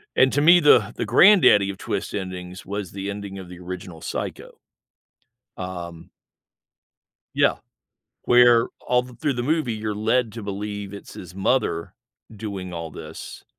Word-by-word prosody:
And 130 0 +5
to 145 - +2
me, 170 +4 +7
the 120 -9 +5
the - - -2
granddaddy 120 - +6
of 100 - -5
twist - - -4
endings 90 -1 -6
was 100 -2 -5
the 100 0 -5
ending 100 -1 -6
of 95 -2 -9
the 90 -1 -11
original 90 -2 -8
Psycho, - - -6 1.0
um 85 -2 -7 1.2
Yeah. - - +3 0.7
Where 120 -1 +5
all 125 0 +1
th 125 -1 -14
through 150 -3 0
the 120 - -2
movie, 150 -2 0
you're 110 -1 -3
led 110 +2 +1
to 115 +1 -7
believe 100 0 -5
it's 100 - -11
his 90 -1 -10
mother 95 -4 0 0.4
doing 100 -4 -6
all 85 -1 -5
this - - -10
100 Hz, 150 wpm, -23 LUFS, 95-120 Hz, 1.2 s, me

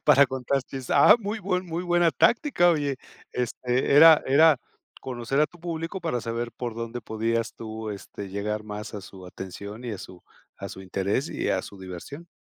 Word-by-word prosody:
para 140 -1 +7
contar 130 +1 -1
chistes, 130 -1 -8
ah, 210 - +7
muy 210 +1 -4
buen 185 -1 -1
muy 170 +1 -3
buena 175 -1 +3
táctica, 235 - +3
oye, 145 -4 0 0.4
este, 125 +2 0
era 160 0 +9
era 150 +1 +6 0.4
conocer 130 +2 -2
a 155 - +5
tu 175 +1 -19
público 165 +2 -4
para 125 -7 -1
saber 115 +1 -3
por 120 -3 -5
dónde 115 +1 -5
podías 115 +1 -2
tú, 110 -1 -6
este, 100 0 -8
llegar 105 +2 -3
más 105 +1 -7
a 105 - -5
su 95 -1 -12
atención 100 +5 -8
y 115 - -3
a 100 - -6
su 90 -1 -11 0.3
a - - -7
su 95 - -9
interés 100 - -1
y - - -2
a 95 - 0
su 100 - -11
diversión. 95 - -9
125 Hz, 190 wpm, -26 LUFS, 105-160 Hz, 0.4 s, era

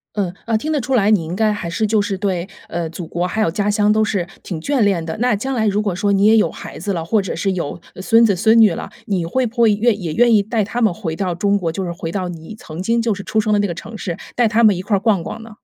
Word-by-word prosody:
嗯， 190 -4 -1
啊 230 -1 +1
听 310 +8 -2
得 295 - +1
出 260 +2 -2
来， 210 -4 +3
你 175 -6 +2
应 170 +3 -5
该 215 -1 +2
还 200 -5 -4
是 215 +6 0
就 215 0 +2
是 195 -1 -3
对 190 -3 -2 0.2
呃 170 -1 -3
祖 170 +1 -7
国， 175 +2 -2
还 215 +4 -1
有 165 - +2
家 205 +4 0
乡 210 0 +3
都 215 0 +3
是 195 -5 -1 0.2
挺 165 -5 -5
眷 280 - 0
恋 195 -6 +2
的。 160 - -4
那 245 -2 +2
将 265 +6 -3
来 220 -3 +1
如 205 +1 +1
果 205 -4 -1
说 200 +2 0
你 200 +1 +3
也 220 +1 +6
有 190 -7 +3
孩 - - -10
子 200 +4 -2
了， 170 -3 -3
或 205 +4 +1
者 190 - -4
是 195 +3 0
有 175 -2 -4 0.2
孙 225 +5 +5
子 200 - +2
孙 220 +5 +4
女 210 -5 +6
了， - - -6 0.2
你 185 -5 -1
会 255 +9 0
不 225 - -8
会 225 - +6
愿 220 0 +1
也 165 -3 -3
愿 240 -1 +4
意 205 - +5
带 220 +1 -1
他 235 +4 -4
们 215 -4 +3
回 170 -3 -4
到 185 +1 -2
中 200 +4 +1
国， 175 -5 -1
就 185 +4 -4
是 175 - -3
回 165 -1 -5
到 185 -1 -3
你 170 +4 -9
曾 160 +3 -7
经 230 +4 +1
就 230 -2 0
是 200 - -7
出 220 - 0
生 215 0 0
的 210 - +3
那 205 - 0
个 170 - -3
城 220 +5 -9
市， 175 -5 -4 0.2
带 240 -2 +3
他 230 +2 +2
们 210 -3 +5
一 180 - -4
块 200 +1 +1
儿 - - -2
逛 200 -5 +2
逛 220 - -7
呢？ 225 - -12
205 Hz, 340 characters per minute, -19 LUFS, 175-220 Hz, 0.2 s, 也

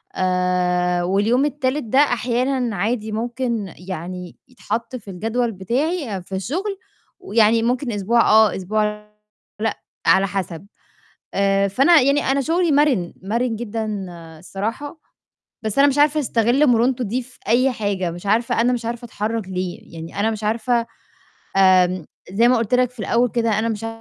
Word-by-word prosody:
آآ، 180 -1 +1
واليوم 210 +9 +2
التالت 290 0 -1
ده 240 +4 +1
أحيانًا 250 -2 +1
عادي 215 +3 -1
ممكن 230 -3 -3
يعني 180 0 -7
يتحَط 250 0 -5
في 210 -5 -8
الجدول 225 +5 -1
بتاعي 240 - -2
في 190 - -7
الشُغل 355 - -3 0.4
ويعني 230 - +3
ممكن 250 +2 0
أسبوع 215 +3 +2
آه، 220 -3 +5
أسبوع 210 +2 -2 0.5
لأ، 220 -1 -1 0.3
على 195 +1 +5
حَسَب. 185 -1 -5 0.7
آآ 195 0 +2
فأنا 280 - +5
يعني 280 +3 +3
أنا 275 +1 +1
شُغلي 335 +3 +1
مَرِن، 275 - +2
مَرِن 230 +4 -1
جدًا 225 -1 -4 0.5
الصراحة، 225 - -5 0.6
بس 220 +3 -3
أنا 280 +1 +6
مش 280 +1 -1
عارفة 300 +1 +4
أستَغِل 245 +3 +2
مرونته 245 0 +2
دي 240 +5 -2
في 255 +1 -18
أي 255 +3 +3
حاجة، 200 -6 -2
مش 175 +4 -9
عارفة 225 +3 +1
أنا 245 +2 +3
مش 240 -2 -2
عارفة 235 +1 -4
أتحرّك 220 -2 -3
ليه، 180 -2 -5
يعني 165 +4 -6
أنا 220 - +2
مش 215 -1 -5
عارفة 235 +2 0 0.7
آمم، 185 -2 +4 0.3
زي 230 +5 +4
ما 250 - +4
قُلت 230 +1 0
لك 250 -1 +3
في 250 - -24
الأول 235 +4 +2
كده، 230 -3 +1
أنا 225 +1 0
مش 225 0 -3
225 Hz, 155 wpm, -21 LUFS, 195-250 Hz, 0.7 s, أنا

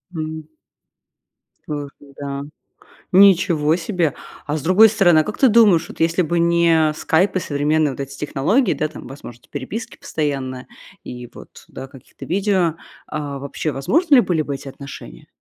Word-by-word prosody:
М. 155 0 -5 1.2
Ух 145 -1 -4
ты. 140 -1 -17
Да. 140 -1 -4 0.7
Ничего 180 -5 +5
себе. 175 -5 -1 0.3
А 150 +1 -2
с 150 - -5
другой 195 +6 +6
стороны, 175 -7 +4
а 155 - 0
как 210 - -6
ты 265 - +5
думаешь, 205 -7 +4
вот - - -12
если 165 +2 +2
бы 170 +2 -1
не 170 -2 +3
скайп 185 +5 +1
и - - +2
современные 150 0 0
вот 130 - -9
эти 135 0 -6
технологии, 150 - +1
да, 155 - -2
там 150 - -11
возможности 120 -3 -12
переписки 145 - -6
постоянная 135 -4 -4 0.4
и 125 0 -8
вот, - - -14
да, 135 0 -9
каких-то 135 -2 -14
видео, 185 -3 +1 0.3
а, 145 -2 -5
вообще 140 +2 -4
возможны 290 - +2
ли - - +8
были 175 -7 0
бы 140 -1 -4
эти 135 0 -8
отношения? 135 - -11
155 Hz, 165 wpm, -20 LUFS, 140-180 Hz, 1.2 s, ли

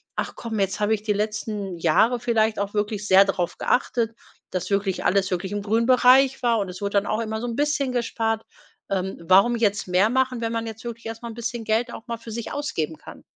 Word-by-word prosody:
„Ach - - -3
komm, 225 -2 -4
jetzt 195 -1 0
habe 210 +1 +2
ich 210 - -10
die 215 -1 +1
letzten 210 -2 -3
Jahre 195 +9 +3
vielleicht 225 -2 +1
auch 200 0 -2
wirklich 210 0 -2
sehr 195 0 +7
drauf 180 -3 -2
geachtet, 230 -3 0 0.3
dass 185 +2 -4
wirklich 195 -1 0
alles 195 +1 +2
wirklich 185 +1 -2
im 205 0 -2
grünen 220 +3 +1
Bereich 255 +2 +5
war 235 -2 +2
und 200 -3 -2
es 180 +2 -9
wurde 200 0 -2
dann 200 0 +2
auch 215 - -1
immer 220 -1 -3
so - - -3
'n 235 - -3
bisschen 290 -1 0
gespart. 225 -2 -1 0.5
Ähm, 190 -1 -2
warum 195 +7 +5
jetzt 205 -4 0
mehr 185 +4 +3
machen, 260 0 +1
wenn 230 0 -2
man 230 0 -2
jetzt 225 +1 -8
wirklich 235 0 -7
erst 225 0 -6
mal 235 - -6
'n - - -7
bisschen 235 0 -4
Geld 225 +3 0
auch 225 - -10
mal 235 - -2
für 230 0 -10
sich 230 0 -5
ausgeben 165 - -3
kann?“ - - -12
220 Hz, 235 wpm, -24 LUFS, 200-235 Hz, 0.5 s, sehr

